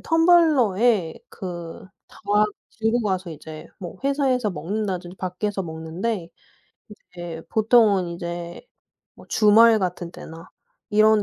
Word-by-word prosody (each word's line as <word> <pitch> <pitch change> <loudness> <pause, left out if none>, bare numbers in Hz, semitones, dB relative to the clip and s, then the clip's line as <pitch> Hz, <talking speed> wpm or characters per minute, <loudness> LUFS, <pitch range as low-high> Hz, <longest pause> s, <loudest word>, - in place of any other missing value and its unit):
텀블러에 250 - +3
그 175 -1 -8 0.2
다 - - -18 0.6
들고 225 +2 +2
가서 190 -5 -2
이제 155 0 -10
뭐 175 -3 -8
회사에서 265 -5 +1
먹는다든지 185 +1 -4
밖에서 195 +2 -3
먹는데 165 +4 -4 0.6
인제 175 -5 -9
보통은 215 -4 +4
인제 170 - -6 0.5
뭐 - - -16
주말 220 +1 +6
같은 180 -2 -3
때나 165 0 -11 0.4
이런 215 0 +4
195 Hz, 235 characters per minute, -23 LUFS, 175-220 Hz, 0.6 s, 주말